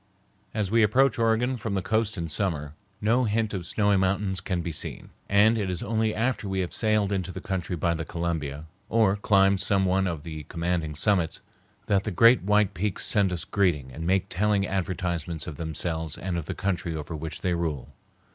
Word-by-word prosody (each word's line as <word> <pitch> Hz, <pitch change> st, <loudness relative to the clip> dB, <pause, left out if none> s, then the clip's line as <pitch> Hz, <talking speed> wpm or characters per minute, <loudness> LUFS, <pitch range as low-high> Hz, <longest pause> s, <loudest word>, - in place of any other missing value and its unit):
As 105 Hz, -3 st, -2 dB
we 115 Hz, 0 st, +4 dB
approach 120 Hz, +4 st, +3 dB
Oregon 115 Hz, +3 st, +2 dB
from 110 Hz, -3 st, -3 dB
the 95 Hz, -, 0 dB
coast 110 Hz, -1 st, 0 dB
in 85 Hz, -1 st, -3 dB
summer, 80 Hz, -4 st, -2 dB, 0.3 s
no 120 Hz, +4 st, +3 dB
hint 110 Hz, 0 st, 0 dB
of 90 Hz, -4 st, -4 dB
snowy 105 Hz, 0 st, +2 dB
mountains 95 Hz, 0 st, 0 dB
can 90 Hz, -2 st, -2 dB
be 85 Hz, -, -3 dB
seen, 75 Hz, -, -4 dB, 0.2 s
and 110 Hz, +3 st, +5 dB
it 100 Hz, -3 st, -1 dB
is 90 Hz, -2 st, -3 dB
only 110 Hz, 0 st, 0 dB
after 115 Hz, -2 st, -1 dB
we 95 Hz, 0 st, 0 dB
have 90 Hz, -, -4 dB
sailed 110 Hz, -2 st, +1 dB
into 95 Hz, -2 st, -2 dB
the 95 Hz, -, -6 dB
country 90 Hz, -2 st, -3 dB
by 85 Hz, +1 st, +1 dB
the 80 Hz, 0 st, -3 dB
Columbia, 80 Hz, -4 st, -3 dB, 0.2 s
or 110 Hz, -3 st, +3 dB
climbed 100 Hz, -1 st, +3 dB
some 95 Hz, -1 st, +2 dB
one 95 Hz, +1 st, +2 dB
of 80 Hz, -5 st, -4 dB
the 80 Hz, -2 st, -6 dB
commanding 85 Hz, -2 st, -2 dB
summits, 85 Hz, +1 st, +1 dB, 0.4 s
that 100 Hz, -1 st, +2 dB
the 110 Hz, -, -2 dB
great 115 Hz, +6 st, +6 dB
white 105 Hz, +1 st, +2 dB
peaks 100 Hz, +2 st, -1 dB
send 100 Hz, -3 st, +3 dB
us 90 Hz, -2 st, -3 dB
greeting 80 Hz, -10 st, 0 dB
and 80 Hz, +6 st, -7 dB
make 95 Hz, 0 st, +2 dB
telling 100 Hz, +1 st, +1 dB
advertisements 85 Hz, -4 st, -2 dB
of 75 Hz, -, -7 dB
themselves 80 Hz, 0 st, -3 dB
and 90 Hz, -1 st, -3 dB
of 85 Hz, -2 st, -3 dB
the -, -, -3 dB
country 90 Hz, -4 st, -2 dB
over 75 Hz, +1 st, -5 dB
which 80 Hz, +1 st, -6 dB
they 90 Hz, -, 0 dB
rule. 75 Hz, -6 st, -3 dB
95 Hz, 200 wpm, -26 LUFS, 85-105 Hz, 0.4 s, great